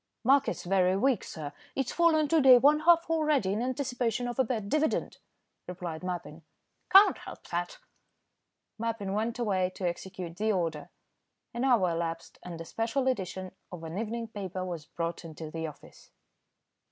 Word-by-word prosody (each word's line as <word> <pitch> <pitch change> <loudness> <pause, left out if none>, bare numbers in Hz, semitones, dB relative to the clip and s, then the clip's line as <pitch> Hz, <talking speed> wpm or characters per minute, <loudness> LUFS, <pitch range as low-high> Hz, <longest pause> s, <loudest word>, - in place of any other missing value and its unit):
"Market's 270 +3 +3
very 185 0 +2
weak, 260 +3 +2
sir. 150 -3 -7 0.2
It's 270 -3 -1
fallen 320 -3 +3
to 325 -2 +4
day 260 -2 +9
one 290 +4 +5
half 335 +1 +5
already 305 -11 +1
in 215 - -1
anticipation 245 -2 -1
of 240 +2 -5
a - - +6
bad 220 -4 -3
dividend," 305 +7 0 0.5
replied 175 -2 -6
Mappin. 175 -3 -5 0.5
"Can't 390 +2 +7
help - - -10
that." 175 0 -3 1.0
Mappin 225 -4 -2
went 225 +3 -1
away 195 -6 +1
to 185 - -2
execute 175 -1 -6
the 215 +2 +1
order. 165 -5 -2 0.6
An 235 +2 -2
hour 230 -10 +3
elapsed, 165 0 -4
and 170 -2 -8
a 165 - -6
special 230 +8 -1
edition 190 -6 -2 0.2
of 175 -2 -8
an 165 +4 -5
evening 230 +1 -3
paper 190 -3 -5
was 170 -4 -6
brought 170 +1 -4
into 160 -1 -8
the 160 0 -3
office. 150 - -14
200 Hz, 160 wpm, -29 LUFS, 175-255 Hz, 1.0 s, day